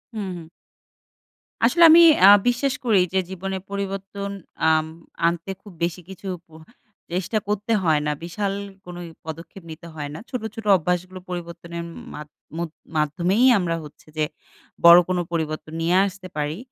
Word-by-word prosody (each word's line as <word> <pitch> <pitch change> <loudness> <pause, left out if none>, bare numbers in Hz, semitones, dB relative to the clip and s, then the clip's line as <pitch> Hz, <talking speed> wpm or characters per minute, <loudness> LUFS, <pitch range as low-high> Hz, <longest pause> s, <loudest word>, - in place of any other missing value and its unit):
হুম, 205 -3 -3
হুম। 165 -2 -10 1.2
আসলে 340 - +4
আমি 330 +2 +9 0.2
আ - - +10 0.2
বিশ্বাস 245 +3 +1
করি 220 -5 +4
যে 190 - +3
জীবনে 190 +1 -4
পরিবর্তন 200 0 -4 0.4
আম 160 0 +3 0.4
আনতে 170 +2 0
খুব 205 - -13
বেশি 175 +1 -1
কিছু 190 +1 -9 0.2
প - - -48 0.6
চেষ্টা 185 +5 -1
করতে 210 +2 -2
হয় 160 -3 +3
না। 150 - +1
বিশাল 195 +4 -2 0.3
কোনোই 175 -1 -8 0.2
পদক্ষেপ 165 +3 -9
নিতে 170 +2 -10
হয় 145 -2 -5
না। - - -7
ছোট, 250 -3 -4
ছোট 225 - -8
অভ্যাসগুলো 180 +1 -2
পরিবর্তনের 170 -1 -6
উম - - -10 0.2
মাধ 150 - -8 0.3
মধ 170 0 -3 0.3
মাধ্যমেই 175 - +2
আমরা 175 -3 -1
হচ্ছে 150 +1 -14
যে 155 - +2 0.6
বড় 170 +1 +11
কোন 185 - +1
পরিবর্তন 155 -1 -3
নিয়ে 170 +2 +2
আসতে 190 -1 -9
পারি। 150 +2 -2
180 Hz, 155 wpm, -23 LUFS, 165-195 Hz, 1.2 s, বড়